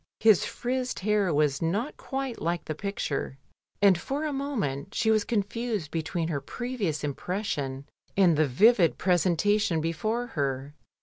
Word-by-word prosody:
His 220 -4 +5
frizzed 250 -2 -3
hair 205 -2 +2
was 145 -2 +2
not 205 - -1
quite 270 -3 -4
like 170 +1 -1
the 155 - -3
picture, 155 -6 -3 0.5
and 195 -2 +7
for 275 - -3
a 300 - -2
moment 210 - -3
she 220 - +2
was 215 -1 +3
confused 215 -5 -2
between 165 0 -2
her 145 -4 -2
previous 210 - -3
impression 145 -3 -3 0.3
and 180 -5 +5
the 155 0 +3
vivid 190 - +4
presentation 180 +1 +2
before 195 +10 -1
her. 140 -1 -2
190 Hz, 140 wpm, -27 LUFS, 155-225 Hz, 0.5 s, and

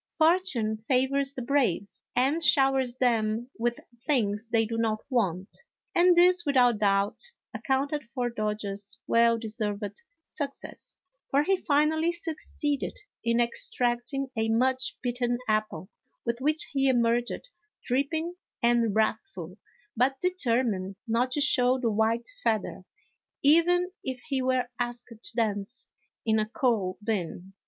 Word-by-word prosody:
" - - -49
Fortune 315 - +2
favors 265 +4 +1
the 255 - -5
brave," 240 -8 +1 0.3
and 275 +6 +2
showers 270 -4 +4
them 235 -1 0
with 240 +1 0 0.3
things 225 -6 +1
they 225 -1 +2
do 230 +1 -4
not 225 -1 -1
want, 190 -7 -1 0.4
and 355 +1 +5
this, 355 0 +5
without 250 -7 +3
doubt, 200 -1 +1 0.3
accounted 280 +2 -1
for 245 +1 -3
Dodge's 210 -2 -4
well 230 0 +4
deserved 215 - -4 0.2
success, 285 -5 -7 0.3
for 280 +2 +3
he 385 +5 +3
finally 315 0 +2
succeeded 315 -4 -2 0.3
in 235 0 +1
extracting 250 - 0
a 225 0 0
much 255 +3 +1
bitten 245 -1 0
apple 215 -6 -1 0.4
with 235 +1 -2
which 305 +3 0
he 275 -1 +1
emerged 240 - 0 0.3
dripping 315 +7 -1 0.3
and 235 -3 +2
wrathful, 205 -4 -2 0.4
but 265 +3 +1
determined 235 - 0
not 240 +3 +1
to 290 - +1
show 255 -3 +4
the 235 -3 0
white 220 +2 +1 0.2
feather, 215 -4 -1 0.6
even 350 +5 +4
if 260 -1 -4
he 270 -2 0
were 255 -1 +1
asked 240 0 -4
to 225 -2 -11
dance 215 +1 -2 0.4
in 220 -1 +2
a 215 - 0
coal 220 -7 0
bin. 190 -3 -3
240 Hz, 130 wpm, -27 LUFS, 220-275 Hz, 0.6 s, and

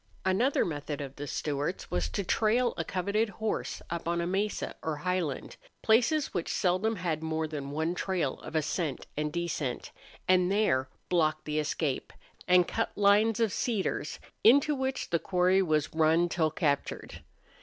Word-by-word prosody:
Another 220 +9 +2
method 145 -2 -4
of 140 -1 -6
the 145 +1 -5
Stewarts 145 +5 -3
was 85 -3 0
to 200 - -2
trail 230 +5 +2
a 165 - -2
coveted 200 +6 0
horse 215 +2 -3
up 170 -1 -3
on 170 0 0
a 170 - 0
mesa 195 +4 -1
or 160 -1 -2
highland, 175 -2 -2 0.3
places 250 +7 +3
which 175 - -2
seldom 190 +5 +1
had 170 -5 -2
more 160 0 -1
than 145 -3 -5
one 160 +4 -1
trail 180 -6 -1
of - - -9
ascent 155 -2 -1
and 150 0 -1
descent, 160 -6 -3 0.4
and 185 0 +4
there 140 -11 +2 0.2
block 155 -3 +2
the 150 0 -1
escape, 150 -2 -2 0.4
and 180 -1 +5
cut 225 - -1
lines 210 +2 +4
of 225 -4 +2
cedars, 205 - -1 0.3
into 285 +6 +6
which 265 -1 -2
the 170 - +2
quarry 185 +2 +3
was 155 -5 0
run 160 +2 +3
till 160 -2 +1
captured. 145 -3 -2
175 Hz, 160 wpm, -29 LUFS, 155-205 Hz, 0.4 s, into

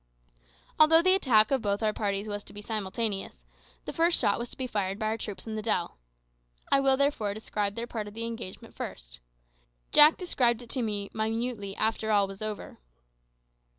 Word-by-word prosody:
Although 325 +2 +7
the 370 +1 +6
attack 235 - +4
of 270 -2 +2
both 205 0 -1
our 215 -1 +2
parties 200 0 -2
was 205 -1 -4
to - - -9
be 205 - -7
simultaneous, 210 -1 -3 0.4
the - - -5
first 335 +1 +3
shot 200 - +1
was 235 0 -4
to - - -9
be 260 - -3
fired 200 -5 -2
by 215 - -3
our 220 +1 0
troops 205 -2 -6
in 220 - -5
the 215 - -3
dell. 195 - -1 0.7
I 275 - +6
will 270 -1 +3
therefore 260 -8 0
describe 205 -2 -3
their 235 - -3
part 220 -3 -5
of 205 - -11
the 230 0 -3
engagement 230 -5 -7
first. - - -8 0.7
Jack 300 +2 +7
described 245 - +1
it 235 - -10
to 260 - -1
me 205 -3 -3
minutely 220 -2 -2
after 220 0 -1
all 205 -1 +4
was 195 +1 -10
over. 215 -1 -6
220 Hz, 190 wpm, -28 LUFS, 205-240 Hz, 0.7 s, Although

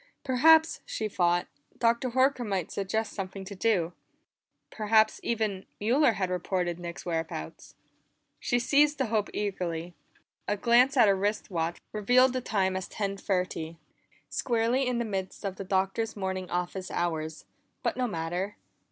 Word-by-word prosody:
Perhaps, 315 +5 +5
she 215 - -3
thought, 175 -3 +1 0.3
Dr. 235 +2 +2
Horker 260 +1 +2
might 195 -6 -2
suggest 205 +2 -2
something 190 0 -5
to 200 - -7
do; 185 -4 +1 0.8
perhaps, 215 0 +3
even, 215 -5 -2
Mueller 240 +4 +3
had 185 -2 -2
reported 180 -1 -1
Nick's 170 -1 -7
whereabouts. 160 - -4 0.6
She 240 - +1
seized 290 +4 +3
the 265 - +1
hope 210 -2 +1
eagerly. 175 -4 -3 0.5
A 205 - 0
glance 250 +6 +4
at 235 - +7
her 200 - +5
wrist 205 +2 -1
watch 170 -1 -1
revealed 245 +5 +4
the 255 - -1
time 190 -5 0
as 190 0 -3
ten 200 -2 -3
thirty; 180 -4 -2 0.5
squarely 240 +2 +1
in 250 -1 0
the 235 - -1
midst 195 -1 -4
of 190 -1 -3
the - - -4
Doctor's 195 +4 0
morning 190 -2 -3
office 180 +1 -3
hours, 160 -2 -2 0.4
but - - 0
no 250 -1 0
matter. 175 +1 -3
200 Hz, 150 wpm, -28 LUFS, 180-235 Hz, 0.8 s, at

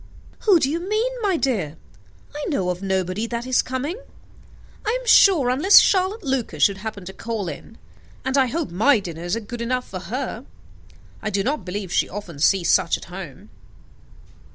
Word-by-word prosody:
"Who 390 -6 +6
do 280 - +1
you 315 +4 -1
mean, 430 +7 -1
my 395 -5 +1
dear? 195 - -1 0.6
I 295 - -4
know 185 - 0
of 180 +1 -6
nobody 190 +2 -1
that 235 +1 -4
is 255 0 +3
coming, 280 - -4 0.8
I 445 +4 0
am - - -12
sure, 335 - +6
unless 310 +11 +6
Charlotte 390 +3 +4
Lucas 265 -3 -1
should 200 -2 +3
happen 210 -2 -6
to 190 - -8
call 225 -4 -4
in; 165 +8 -8 0.5
and 265 +1 0
I 265 -2 +4
hope 310 - -3
my 225 +8 +4
dinners 175 0 -4
are - - -2
good 235 +2 -7
enough 250 +1 -2
for 185 - -6
her. 235 +5 -5 0.8
I 215 - -2
do 200 -1 0
not 290 +7 -2
believe 185 -1 -5
she - - +2
often 180 -7 -8
sees 175 +2 +3
such - - +3
at - - -12
home." 190 +2 -9
230 Hz, 180 wpm, -22 LUFS, 190-285 Hz, 0.8 s, Who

